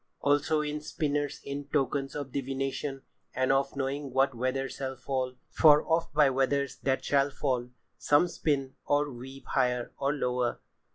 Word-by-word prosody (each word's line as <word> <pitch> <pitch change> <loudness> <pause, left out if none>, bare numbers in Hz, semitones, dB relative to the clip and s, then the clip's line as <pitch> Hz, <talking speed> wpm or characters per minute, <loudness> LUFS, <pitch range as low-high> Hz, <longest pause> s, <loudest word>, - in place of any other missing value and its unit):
"Also 145 +2 +2
in 150 0 -3
spinners 145 -1 -2
be 140 +1 -5
tokens 135 -1 0
of 140 -3 -4
divination, 135 +1 -3 0.3
and 130 0 +2
of 135 +1 +1
knowing 140 0 -2
what 135 +1 +3
weather 130 +3 -1
shall 135 0 -5
fall—for 130 +3 +2
oft 165 0 +1
by 150 -2 +6
weathers 135 +1 +1
that 135 -1 -1
shall 140 0 +3
fall, 130 -3 -1 0.3
some 145 +4 +4
spin 140 -5 -1
or 145 0 +1
weave 135 +2 -10
higher 125 -2 0
or 140 0 +1
lower. 125 -4 -1
135 Hz, 150 wpm, -29 LUFS, 130-145 Hz, 0.3 s, by